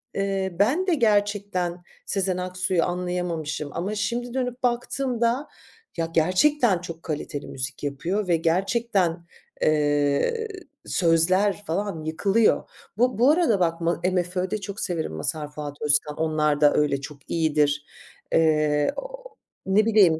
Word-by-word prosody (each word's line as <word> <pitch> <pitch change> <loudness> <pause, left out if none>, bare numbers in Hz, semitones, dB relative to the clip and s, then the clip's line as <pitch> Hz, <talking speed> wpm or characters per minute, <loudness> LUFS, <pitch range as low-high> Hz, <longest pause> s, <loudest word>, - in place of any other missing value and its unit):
eee, 195 -2 -1
ben 295 - +2
de 360 - +3
gerçekten 205 - 0 0.2
Sezen 190 -2 0
Aksu'yu 180 -1 0
anlayamamışım 175 -4 -3
ama 195 +5 -3
şimdi 235 +4 -2
dönüp 250 -1 -3
baktığımda, 245 +1 0 0.5
ya, 165 - 0
gerçekten 185 - +3
çok 165 -2 -8
kaliteli 150 -2 -4
müzik 130 +2 -6
yapıyor 175 +8 -2
ve 170 - +3
gerçekten, 180 0 0 0.4
eee, 150 - +2 0.4
sözler 185 +5 +2
falan 175 -1 -2
yıkılıyor. 195 +8 +2 0.3
Bu 250 -2 +2
bu 255 +4 +6
arada 310 - +3
bak 165 -1 0
ma 170 0 0
MFÖ'de 185 +2 -1
çok 200 +2 -6
severim 165 - -2
Mazhar 150 - -3
Fuat 150 -1 -6
Özkan. 150 0 +1
Onlar 155 -2 +1
da 145 - +6
öyle 140 -2 +1
çok 140 -1 -11
iyidir. 150 -2 +1 0.5
Eee, 150 -2 +3
o - - -7 0.4
ne 200 +3 +3
bileyim. 195 -8 +5
180 Hz, 130 wpm, -24 LUFS, 155-210 Hz, 0.5 s, bu